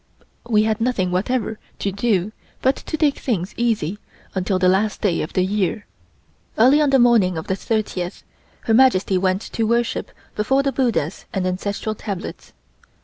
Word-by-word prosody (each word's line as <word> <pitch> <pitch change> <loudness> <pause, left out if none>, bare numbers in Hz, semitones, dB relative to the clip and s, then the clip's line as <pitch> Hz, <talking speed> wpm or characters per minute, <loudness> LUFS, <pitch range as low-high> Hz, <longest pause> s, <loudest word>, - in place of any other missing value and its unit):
We 215 -2 +4
had 220 0 0
nothing 215 -7 0
whatever 220 +3 -1 0.2
to 200 - -2
do 200 -1 0 0.3
but 265 +1 +3
to 315 - -5
take 295 -2 +1
things 195 -7 -2
easy 210 -6 -1 0.3
until 190 0 0
the 185 0 +2
last 195 +3 +1
day 180 -5 +1
of 155 - -5
the 185 - +2
year. 205 +1 -1 0.7
Early 260 +7 +6
on 295 - +3
the 270 - +5
morning 230 -8 +4
of 160 - -4
the 190 - -1
thirtieth 195 -4 -3 0.4
Her 225 - 0
Majesty 215 -6 +4
went 185 +1 +1
to 225 -1 -2
worship 235 +1 0 0.3
before 265 +6 +2
the 275 - +1
Buddhas 230 - -1
and 190 -1 0
Ancestral 200 +4 -2
Tablets. 200 -3 -6
210 Hz, 165 wpm, -21 LUFS, 185-240 Hz, 0.7 s, Early